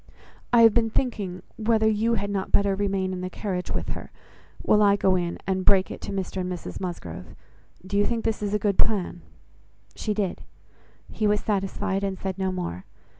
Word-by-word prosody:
I 235 -1 +7
have 225 -2 +8
been 230 -1 +3
thinking 200 -7 -2
whether 220 0 +3
you 220 +2 +2
had 200 -1 -2
not 195 -1 -2
better 200 -1 +3
remain 195 -1 0
in 180 - -4
the 185 - -3
carriage 185 -2 -3
with - - -2
her, - - -5 0.5
while 210 - +4
I 200 -1 +6
go 190 -2 +3
in 175 -1 -1
and 190 -1 0
break 190 0 +4
it - - -7
to - - -5
Mr 190 -1 -3
and 180 0 -3
Mrs 180 - -6
Musgrove. 90 - -6 0.5
Do 200 +2 0
you 205 - +4
think 235 -1 -2
this 225 - 0
is 205 0 0
a 210 - -2
good 200 -2 +1
plan?" 190 -5 +1 0.7
She 210 -2 -2
did: 200 -4 -1 0.7
he 215 - 0
was 210 0 +2
satisfied, 195 -1 -1
and 195 -1 -1
said 190 0 -4
no 190 -1 0
more. 95 - -4
195 Hz, 200 wpm, -26 LUFS, 185-210 Hz, 0.7 s, have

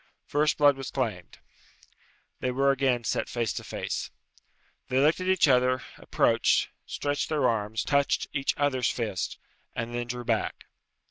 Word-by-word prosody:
First 150 +1 +1
blood 145 -2 +5
was 135 - -5
claimed. 105 -10 -3 1.0
They 130 - -1
were 135 +2 +3
again 130 -3 +1
set - - -1
face 115 -4 -1
to - - -5
face. - - -4 0.8
They 130 - -1
looked 150 +5 +4
at 185 - -3
each 185 -4 +4
other, 130 -1 +3
approached, - - +2 0.2
stretched 145 0 -2
their 150 -5 +2
arms, 110 -1 -1
touched 140 -1 +1
each 140 -1 0
other's 135 -3 +1
fists, 110 -6 -3 0.4
and 115 0 -3
then 120 0 -3
drew 120 0 -5
back. 115 -2 -1
130 Hz, 150 wpm, -27 LUFS, 120-140 Hz, 1.0 s, blood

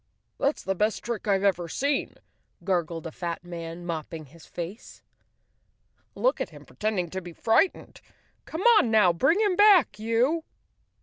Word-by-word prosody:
That's 280 +2 0
the 195 - -1
best 210 +3 -1
trick 235 -2 -4
I've 195 -1 +2
ever 180 -4 +1
seen," 280 - -1 0.5
gurgled 170 -3 -1
a 165 - -5
fat 170 +1 -5
man, 170 0 -7
mopping 160 -1 -5
his 160 +4 -17
face. 180 +7 -8 1.1
"Look - - +1
at - - -2
him - - -14
pretending 195 -6 -2
to 190 - -4
be 175 -1 -10
frightened. 225 - 0 0.4
Come 320 - -5 0.2
on 235 - +1
now, 210 -6 +4
bring 270 - +2
him 405 -4 +2
back, 400 - +5
you!" 240 +9 +1
195 Hz, 150 wpm, -26 LUFS, 170-255 Hz, 1.1 s, back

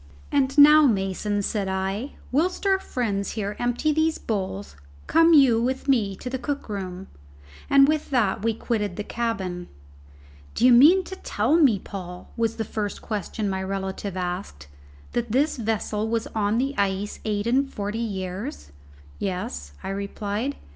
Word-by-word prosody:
"And 275 0 +1
now, 300 +1 +8
Mason," 205 -1 0
said 200 -1 -1
I, 195 +7 -2 0.2
"whilst 335 +9 0
our 385 -1 +3
friends 205 - -2
here 210 -1 -3
empty 245 +6 +1
these 315 +1 +1
bowls, 145 - -4 0.3
come 330 0 +5
you 250 -6 +5
with 260 +3 -2
me 220 -8 +2
to 250 - -9
the 260 +1 -3
cook 285 +3 -4
room." 190 -2 -5 0.6
And 275 0 +7
with 305 0 0
that 235 -10 +1
we 225 0 0
quitted 210 -5 -2
the 210 - -4
cabin. 195 -7 -3 0.9
"D'ye 250 +2 +5
mean 310 +11 +7
to 380 - -8
tell 315 - 0
me, 280 -11 +5
Paul," 180 -2 -8
was 230 -1 0
the 220 - -3
first 205 -1 -4
question 215 0 -3
my 190 -1 -2
relative 190 0 -4
asked, 180 - -4 0.5
"that 240 -2 -2
this 285 +4 +2
vessel 220 -1 -1
was 230 0 0
on 210 0 +1
the 270 +3 0
ice 200 +1 -1
eight 205 -1 -1
and 270 +3 +1
forty 205 +2 -4
years?" 195 - -5 0.5
"Yes," 75 - -4
I - - -4
replied. 205 +6 -3
215 Hz, 155 wpm, -24 LUFS, 195-265 Hz, 0.9 s, now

